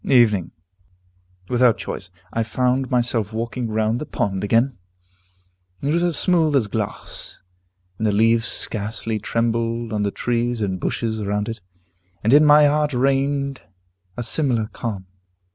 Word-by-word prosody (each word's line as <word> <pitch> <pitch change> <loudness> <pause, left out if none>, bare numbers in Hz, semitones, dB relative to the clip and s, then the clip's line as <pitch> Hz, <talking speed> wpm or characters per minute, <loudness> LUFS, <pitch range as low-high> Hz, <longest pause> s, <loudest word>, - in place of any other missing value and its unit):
Evening. 110 -9 +3 1.0
Without 125 -2 +3
choice, 95 - -5 0.2
I 115 - 0
found 125 +3 0
myself 120 -4 0
walking 115 +2 -3
round 110 +2 0
the 150 - -5
pond 95 -1 -2
again. 115 +3 +1 1.0
It 145 +2 -1
was 170 - +2
as 175 -3 +4
smooth 165 -5 +4
as 130 -5 +3
glass, 105 0 -5 0.6
and 110 - +1
the - - +2
leaves 115 +3 +3
scarcely 110 +1 -2
trembled 115 +1 -1
on 105 - -1
the 100 - +1
trees 120 +2 -1
and 95 -3 -2
bushes 110 +3 -2
round 105 +1 -1
it. 115 -2 -6 0.6
And 110 +4 +3
in 150 +1 +7
my 150 0 +7
heart 150 0 +2
reigned 140 +1 0 0.6
a 120 - -2
similar 120 -3 +1
calm. 105 -6 -5
115 Hz, 145 wpm, -21 LUFS, 110-135 Hz, 1.0 s, in